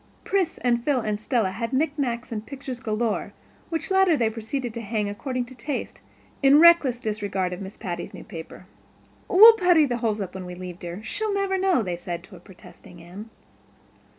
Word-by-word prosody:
Pris 380 Hz, -4 st, 0 dB
and 240 Hz, -1 st, 0 dB
Phil 280 Hz, -2 st, +1 dB
and 210 Hz, -3 st, -2 dB
Stella 220 Hz, -5 st, 0 dB
had 230 Hz, +5 st, -4 dB
knick 285 Hz, +3 st, +2 dB
knacks 245 Hz, -5 st, -3 dB
and 215 Hz, -2 st, -4 dB
pictures 270 Hz, -1 st, -7 dB
galore, 220 Hz, -2 st, -2 dB, 0.4 s
which 325 Hz, +1 st, -4 dB
latter 380 Hz, -4 st, +4 dB
they 225 Hz, -3 st, +1 dB
proceeded 230 Hz, +2 st, -4 dB
to 235 Hz, -, -5 dB
hang 210 Hz, -1 st, -2 dB
according 250 Hz, +5 st, -3 dB
to 255 Hz, -, -13 dB
taste, 260 Hz, +3 st, -5 dB, 0.4 s
in 280 Hz, +1 st, +6 dB
reckless 320 Hz, -8 st, +6 dB
disregard 205 Hz, -5 st, -2 dB
of 180 Hz, -, -7 dB
Miss 195 Hz, +1 st, -8 dB
Patty's 175 Hz, -5 st, -5 dB
new -, -, -10 dB
paper. 175 Hz, -2 st, -10 dB, 0.6 s
"We'll 440 Hz, +5 st, +9 dB
putty 360 Hz, -7 st, +4 dB
the 245 Hz, -3 st, -2 dB
holes 220 Hz, -3 st, -1 dB
up 190 Hz, -3 st, -5 dB
when 185 Hz, -1 st, -7 dB
we 180 Hz, -, -7 dB
leave, 180 Hz, -1 st, -8 dB
dear—she'll 220 Hz, -, -4 dB
never 395 Hz, -1 st, 0 dB
know," 375 Hz, -9 st, +2 dB
they 180 Hz, -3 st, -3 dB
said 175 Hz, -1 st, -6 dB
to 190 Hz, -2 st, -14 dB
protesting 180 Hz, -1 st, -16 dB
Anne. 185 Hz, +6 st, -10 dB
235 Hz, 185 wpm, -24 LUFS, 195-285 Hz, 0.6 s, We'll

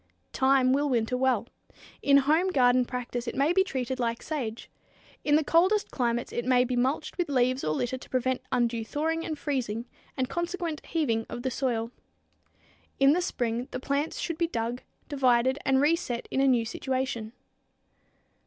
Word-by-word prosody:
Thyme 265 Hz, -1 st, +3 dB
will 290 Hz, +1 st, +1 dB
winter 240 Hz, -1 st, +1 dB
well. 250 Hz, -4 st, +1 dB, 0.6 s
In 280 Hz, 0 st, +5 dB
home 310 Hz, +6 st, +3 dB
garden 250 Hz, -6 st, +3 dB
practice 245 Hz, -1 st, -4 dB
it -, -, -3 dB
may 285 Hz, +5 st, +2 dB
be 380 Hz, +1 st, +4 dB
treated 260 Hz, -6 st, -3 dB
like 235 Hz, -1 st, -1 dB
sage. 240 Hz, -8 st, -4 dB, 0.6 s
In 295 Hz, -, +3 dB
the 310 Hz, -, +3 dB
coldest 370 Hz, +7 st, +2 dB
climates 240 Hz, -1 st, -1 dB
it 240 Hz, -, -2 dB
may 250 Hz, 0 st, +4 dB
be 250 Hz, 0 st, -2 dB
mulched 270 Hz, +7 st, -1 dB
with 350 Hz, -, 0 dB
leaves 255 Hz, -1 st, +1 dB
or 155 Hz, -, 0 dB
litter 250 Hz, +6 st, -2 dB
to -, -, -13 dB
prevent 255 Hz, 0 st, 0 dB
undue 235 Hz, -2 st, +1 dB
thawing 320 Hz, +7 st, -2 dB
and 310 Hz, -2 st, -4 dB
freezing 245 Hz, -6 st, -2 dB, 0.3 s
and 260 Hz, -1 st, 0 dB
consequent 345 Hz, -1 st, -3 dB
heaving 230 Hz, -9 st, 0 dB
of 240 Hz, -, -6 dB
the 260 Hz, -, -1 dB
soil. 235 Hz, -3 st, -1 dB, 1.1 s
In 275 Hz, +1 st, +6 dB
the 360 Hz, -, +1 dB
spring 240 Hz, -7 st, -2 dB
the 255 Hz, -, -5 dB
plants 280 Hz, +4 st, -2 dB
should 335 Hz, -2 st, -3 dB
be 340 Hz, -, +2 dB
dug, 235 Hz, -3 st, -3 dB, 0.3 s
divided 260 Hz, -1 st, +2 dB
and 265 Hz, 0 st, +3 dB
reset 295 Hz, -5 st, 0 dB
in 270 Hz, -, +1 dB
a 275 Hz, -, +4 dB
new 245 Hz, -3 st, +3 dB
situation. 255 Hz, -2 st, -3 dB
260 Hz, 170 wpm, -28 LUFS, 240-290 Hz, 1.1 s, In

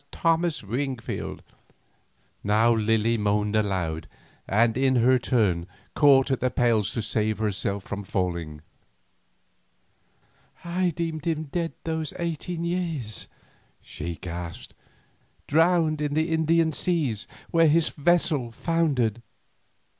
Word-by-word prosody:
"Thomas 165 Hz, -2 st, +1 dB
Wingfield." 125 Hz, +3 st, -4 dB, 1.0 s
Now 110 Hz, +3 st, +4 dB
Lily 115 Hz, +1 st, +1 dB
moaned 105 Hz, 0 st, +1 dB
aloud, 95 Hz, -7 st, -1 dB, 0.4 s
and 115 Hz, +3 st, +3 dB
in 130 Hz, 0 st, +2 dB
her 125 Hz, +2 st, +4 dB
turn 100 Hz, -9 st, +1 dB, 0.3 s
caught 135 Hz, -2 st, +5 dB
at 130 Hz, -, +1 dB
the 130 Hz, -, +1 dB
pales 115 Hz, -4 st, +1 dB
to 115 Hz, -, -2 dB
save 110 Hz, 0 st, 0 dB
herself 100 Hz, -2 st, -2 dB
from 100 Hz, 0 st, -5 dB
falling. 85 Hz, -6 st, -3 dB, 2.0 s
"I 180 Hz, +1 st, +1 dB
deemed 165 Hz, -2 st, -4 dB
him 160 Hz, -2 st, 0 dB
dead 165 Hz, +3 st, -3 dB
these 160 Hz, -1 st, -2 dB
eighteen 170 Hz, 0 st, -3 dB
years," 165 Hz, -11 st, -3 dB, 0.5 s
she 85 Hz, 0 st, -6 dB
gasped; 85 Hz, +1 st, -7 dB, 0.7 s
"drowned 160 Hz, 0 st, +3 dB
in 145 Hz, -1 st, -1 dB
the 160 Hz, +2 st, +1 dB
Indian 160 Hz, 0 st, +3 dB
seas 145 Hz, -, -1 dB, 0.2 s
where 165 Hz, -1 st, +5 dB
his 160 Hz, +1 st, +3 dB
vessel 150 Hz, -6 st, +1 dB
foundered." 130 Hz, -, 0 dB
130 Hz, 110 wpm, -26 LUFS, 105-160 Hz, 2.0 s, caught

